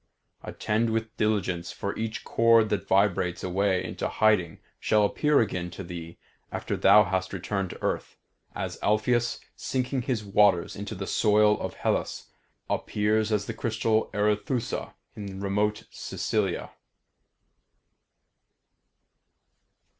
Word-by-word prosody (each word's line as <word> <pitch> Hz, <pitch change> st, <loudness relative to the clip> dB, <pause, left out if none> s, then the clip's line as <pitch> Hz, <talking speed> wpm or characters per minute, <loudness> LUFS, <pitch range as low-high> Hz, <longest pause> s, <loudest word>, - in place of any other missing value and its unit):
Attend 110 Hz, +2 st, -1 dB
with 110 Hz, 0 st, -2 dB
diligence, 95 Hz, -5 st, 0 dB
for 100 Hz, -, -4 dB
each 110 Hz, +1 st, -4 dB
chord 115 Hz, -1 st, +4 dB
that 100 Hz, -1 st, -2 dB
vibrates 95 Hz, -2 st, +2 dB
away 95 Hz, +1 st, +1 dB
into -, -, -3 dB
hiding 105 Hz, -7 st, +2 dB, 0.2 s
shall 105 Hz, -1 st, +3 dB
appear 150 Hz, +7 st, +2 dB
again 90 Hz, -5 st, -2 dB
to 95 Hz, +3 st, -8 dB
thee 85 Hz, -1 st, -8 dB, 0.3 s
after -, -, -3 dB
thou 105 Hz, -, +6 dB
hast 95 Hz, 0 st, -2 dB
returned 95 Hz, 0 st, -2 dB
to -, -, -10 dB
earth, -, -, -2 dB, 0.4 s
as -, -, -4 dB
Alpheus, 120 Hz, +3 st, +1 dB, 0.2 s
sinking 130 Hz, 0 st, -2 dB
his 120 Hz, -3 st, -2 dB
waters 100 Hz, -3 st, +3 dB
into 100 Hz, +2 st, -6 dB
the 95 Hz, +1 st, -5 dB
soil 105 Hz, +1 st, +4 dB
of -, -, -4 dB
Hellas, -, -, -2 dB, 0.4 s
appears 110 Hz, +1 st, 0 dB
as 105 Hz, -1 st, +1 dB
the -, -, -4 dB
crystal 110 Hz, -1 st, 0 dB
Arethusa 105 Hz, +4 st, -1 dB, 0.2 s
in 100 Hz, -2 st, -7 dB
remote 105 Hz, +2 st, 0 dB
Sicilia." 100 Hz, -5 st, -2 dB
105 Hz, 120 wpm, -27 LUFS, 95-110 Hz, 0.4 s, thou